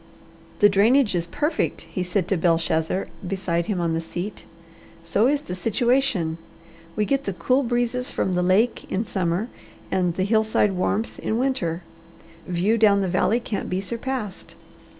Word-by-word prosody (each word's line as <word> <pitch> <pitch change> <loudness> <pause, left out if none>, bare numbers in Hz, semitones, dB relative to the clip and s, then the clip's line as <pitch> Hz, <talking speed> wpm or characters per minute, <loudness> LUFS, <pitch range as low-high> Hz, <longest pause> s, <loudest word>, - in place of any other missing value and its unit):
"The 205 - +9
drainage 215 +5 +4
is 170 -1 -1
perfect," 295 - -1
he 185 - -5
said 180 0 -1
to 195 - +2
Belshazzar 165 +1 +1 0.2
beside 175 -3 -1
him 200 -4 -1
on 170 -1 0
the 165 - -1
seat. 175 +5 -6 0.6
"So 200 +8 +2
is 290 +1 +1
the 235 - -6
situation. 220 -4 +1 0.6
We 210 - +1
get 275 +4 0
the 195 - -2
cool 250 +10 +1
breezes 245 0 -1
from 190 - -1
the 180 - +1
lake 195 +7 +1
in 205 +4 0
summer 185 +2 -1 0.4
and 180 -3 +1
the 185 - 0
hillside 220 0 +2
warmth 200 +4 -1
in 220 - -1
winter. 185 -10 -1 0.6
View 185 +6 +1
down 205 -2 +5
the 190 - 0
valley 190 +6 +2
can't 220 -4 -4
be 185 - -1
surpassed. 230 0 -5
200 Hz, 160 wpm, -24 LUFS, 180-230 Hz, 0.6 s, The